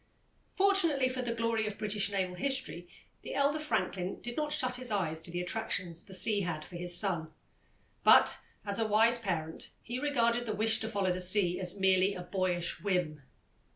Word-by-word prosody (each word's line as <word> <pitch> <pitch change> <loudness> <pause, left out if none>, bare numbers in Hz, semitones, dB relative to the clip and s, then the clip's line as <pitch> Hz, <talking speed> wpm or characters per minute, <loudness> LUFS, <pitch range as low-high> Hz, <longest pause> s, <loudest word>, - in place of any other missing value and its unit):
Fortunately 350 -9 +4
for 255 0 -3
the 235 -2 -2
glory 230 -1 0
of 210 - -5
British 210 -1 -1
naval 190 -2 -1
history, 185 -5 -2 0.3
the - - -6
elder 285 +2 +2
Franklin 195 -11 -2
did 240 0 -6
not 300 -1 -1
shut 255 -4 0
his 255 0 -4
eyes 165 -7 -1
to 165 - -3
the 175 +1 -3
attractions 180 -3 -2
the 190 - -10
sea 205 +2 +1
had 165 -4 -3
for 180 - -12
his 175 0 -2
son, 170 -6 -2 0.7
but, - - +6 0.3
as 200 0 -2
a 225 - +1
wise 225 +3 +4
parent, 165 -7 -4
he 245 +2 -4
regarded 240 -4 +1
the 215 - -2
wish 220 +2 +2
to 220 - -3
follow 195 -4 0
the 185 - -2
sea 180 -1 +2
as 185 +1 -2
merely 190 +1 +3
a 180 - -5
boyish 175 -2 -2
whim. 180 -7 -1
200 Hz, 190 wpm, -31 LUFS, 180-235 Hz, 0.7 s, but